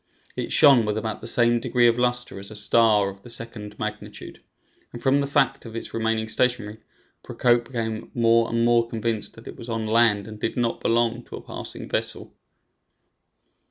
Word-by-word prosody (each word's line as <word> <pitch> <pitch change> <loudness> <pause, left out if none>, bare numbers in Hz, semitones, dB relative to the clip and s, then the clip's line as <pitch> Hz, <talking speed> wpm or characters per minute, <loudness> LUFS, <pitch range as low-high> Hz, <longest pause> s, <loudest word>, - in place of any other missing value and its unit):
It - - -4
shone 135 -5 +6
with 105 0 -1
about 110 0 -4
the 115 - -7
same 120 0 +3
degree 120 +1 +2
of 115 +1 +2
luster 125 -4 -1
as 100 - -3
a 110 - -10
star 105 -1 +3
of 100 0 -12
the 120 - -13
second 105 -3 -5
magnitude, 105 -1 -7 0.5
and 120 - -8
from 135 +2 +2
the 140 - -1
fact 140 -1 +1
of 115 -1 -10
its 115 - -6
remaining 110 -1 -1
stationary, 110 -2 -1 0.4
Procope 120 -1 +1
became 115 -3 -4
more 115 -1 +3
and 115 0 +1
more 120 -1 +3
convinced 115 -1 -3
that 115 - -14
it - - -9
was 115 - -9
on 115 -1 -2
land 110 -2 +3
and 110 -1 -9
did 110 - -3
not 120 -1 0
belong 115 0 +1
to - - -9
a - - -8
passing - - -7
vessel. - - -2
115 Hz, 190 wpm, -24 LUFS, 110-120 Hz, 0.5 s, shone